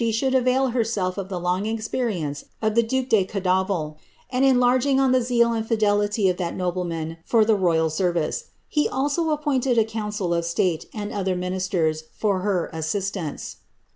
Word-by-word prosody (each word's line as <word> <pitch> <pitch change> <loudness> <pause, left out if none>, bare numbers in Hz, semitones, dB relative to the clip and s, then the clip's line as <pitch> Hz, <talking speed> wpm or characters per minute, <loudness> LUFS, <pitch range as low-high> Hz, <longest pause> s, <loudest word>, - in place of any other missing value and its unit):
should 260 +4 0
a\'ail 260 +1 +3
herself 220 -6 0
of 195 -1 -5
the 185 -2 -3
long 180 +4 -1
experience 215 - -2
of 220 -1 0
the 235 - +5
duke 260 +3 -1
de 220 -6 +4
Ondafil, 185 -5 -1 0.4
nd 255 - +3
enlargin^r 255 +1 +4
on 270 -1 +3
the 255 0 +4
zeal 235 -1 +2
and 225 -1 -2
fidelity 205 -2 +2
of 180 -1 +1
that 175 -2 -3
nobleman 170 -3 -3
for 225 +2 +3
the 220 - +4
royal 170 -5 +2
m^ 175 +3 0
▼ice. 175 - -1 0.2
He 300 - +1
also 290 +5 0
appointed 275 -5 +1
a 225 - +5
council 210 -5 -3
of 170 0 0
state, 170 0 0
and 210 -2 -5
other 190 -2 -1
ministcri, 180 -3 -1 0.2
for 200 -4 +1
hv 185 -4 -1
asiistance.' 185 -1 -3
205 Hz, 170 wpm, -24 LUFS, 180-240 Hz, 0.4 s, the